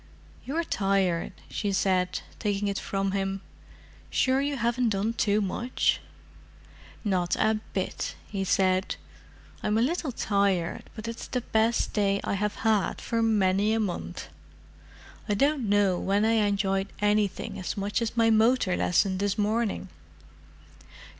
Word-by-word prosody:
"You're 315 +6 -1
tired," 195 - 0
she 205 - -2
said, 185 -1 +1 0.2
taking 205 -1 0
it 200 0 -1
from 195 0 -1
him. 195 0 -2 0.7
"Sure 260 +1 +2
you 285 0 -1
haven't 235 +1 +1
done 210 +2 0
too 210 -2 +2
much?" 235 +6 0 1.0
"Not 185 -5 +1
a 220 0 +2 0.2
bit," 190 - -2
he 195 -2 -3
said. 185 0 +2 0.7
"I'm 210 +1 +1
a - - +3
little 310 +1 -1
tired, 200 -6 0
but 220 0 -6
it's 230 0 -6
the 250 - -2
best 225 0 +1
day 200 -1 +2
I - - -1
have 210 +1 -1
had 215 -3 +2
for 230 -1 -1
many 205 -1 +3
a 225 - +1
month. 175 - -4 1.0
I 205 - +2
don't 275 -1 +1
know 200 -3 +3
when 200 +2 +1
I 220 -2 +3
enjoyed 195 -1 0
anything 210 -1 0
as 185 - -4
much 200 +3 -1
as 230 0 -2
my 225 -1 +4
motor 220 -3 +3
lesson 185 +1 +2
this 200 0 0
morning." 215 -1 0
205 Hz, 140 wpm, -27 LUFS, 195-225 Hz, 1.0 s, my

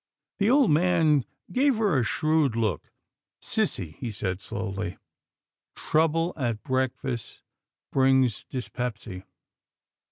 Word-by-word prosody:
The 205 +2 +3
old 265 - +5
man 160 -4 +3 0.3
gave 275 +1 +3
her 205 -10 +2
a - - +1
shrewd 155 0 +1
look. 110 -9 -1 0.3
" - - -65
Sissy," 80 -1 -1
he 120 - -4
said 100 -3 -3
slowly, 100 -3 -4 0.4
" - - -62
trouble 165 +2 +1
at 120 -7 -2
breakfast 130 -2 -3 0.5
brings 130 -3 +3
dys 125 -2 -5
pepsy. 110 -6 -5
130 Hz, 120 wpm, -26 LUFS, 110-160 Hz, 0.5 s, old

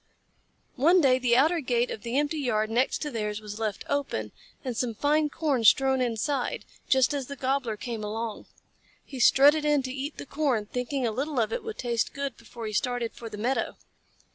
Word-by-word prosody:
One 335 +8 +5
day 260 -5 +4
the 245 -2 +3
outer 320 +6 +4
gate 245 -4 0
of 215 - -5
the 235 +4 -2
empty 295 +2 0
yard 220 -5 0
next 250 +6 +1
to 295 - -4
theirs 210 -3 -3
was 210 0 -8
left 215 -3 -3
open 270 - -2 0.3
and 250 -2 -2
some 235 -1 -1
fine 300 +4 +2
corn 285 -6 0
strewn 265 +3 +5
inside, 250 +3 -1 0.2
just 265 0 +4
as 275 -3 -3
the 280 - -6
Gobbler 260 -4 -1
came 230 -1 -5
along. 220 +1 -4 0.6
He 265 - -8
strutted 290 +5 +6
in 295 -2 +2
to 255 0 -4
eat 280 +2 -5
the - - -7
corn, 275 -7 0
thinking 250 +4 -2
a 230 - +1
little 275 +4 -2
of 225 -1 0
it - - -2
would 445 -1 -6
taste 235 -2 -1
good 280 -2 -3
before 230 0 -9
he 215 - -4
started 240 +2 -1
for 230 - -8
the 210 - -8
meadow. 245 +6 -1
255 Hz, 200 wpm, -27 LUFS, 225-280 Hz, 0.6 s, strutted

